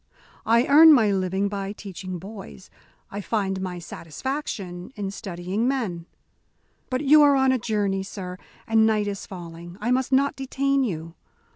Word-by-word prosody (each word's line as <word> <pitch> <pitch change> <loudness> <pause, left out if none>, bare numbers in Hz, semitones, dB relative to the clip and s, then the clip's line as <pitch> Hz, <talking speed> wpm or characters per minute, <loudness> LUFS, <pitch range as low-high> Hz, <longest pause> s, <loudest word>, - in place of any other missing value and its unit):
I 230 +2 +4
earn 310 +3 +8
my 220 -7 +4
living 190 +1 0
by 200 0 -4
teaching 185 -3 -7
boys. 180 - -11 0.4
I 200 - -4
find 195 -3 -1
my 180 -1 -4
satisfaction 180 - -6
in 200 -3 -4
studying 190 +3 -3
men. 200 -11 -2 0.8
But 255 +1 -1
you 300 +1 +6
are 285 -1 +6
on 265 -1 +3
a 260 - +1
journey, 205 -4 -1
sir, 185 -2 -7 0.3
and 225 0 +4
night 215 -1 +1
is 200 -1 -5
falling. 175 -1 -9
I 235 +4 -1
must 260 +1 +1
not 275 +1 +3
detain 275 +1 0
you. 165 -7 -4
205 Hz, 155 wpm, -24 LUFS, 185-255 Hz, 0.8 s, earn